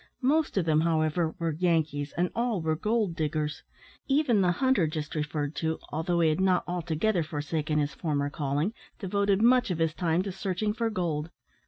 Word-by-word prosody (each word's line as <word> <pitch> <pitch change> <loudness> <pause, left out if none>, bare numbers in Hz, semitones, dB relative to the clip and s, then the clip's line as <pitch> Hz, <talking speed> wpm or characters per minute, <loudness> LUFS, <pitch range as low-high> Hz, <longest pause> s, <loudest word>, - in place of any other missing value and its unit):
Most 300 -1 +2
of 185 - +2
them, 155 -1 +3
however, 160 0 +1
were 165 -2 -1
Yankees, 155 -3 0
and 175 +1 +1
all 235 -3 0
were 160 -1 0
gold 210 0 0
diggers; 150 -1 -2 0.5
even 270 -7 +3
the 180 -1 +3
hunter 260 -4 +2
just 155 -1 -4
referred 150 -1 -2
to, 160 -1 -1
although 170 +3 0
he 160 - +4
had 155 +4 0
not 185 -2 +3
altogether 175 +2 0
forsaken 155 0 -2
his 145 -1 0
former 145 -3 -1
calling, 145 +8 -1 0.2
devoted 200 +1 +1
much 245 -1 +5
of 180 - -1
his 165 -1 +1
time 170 +2 0
to 195 - -4
searching 195 +2 -2
for 230 0 -1
gold. 165 -6 -2
170 Hz, 180 wpm, -28 LUFS, 155-195 Hz, 0.5 s, much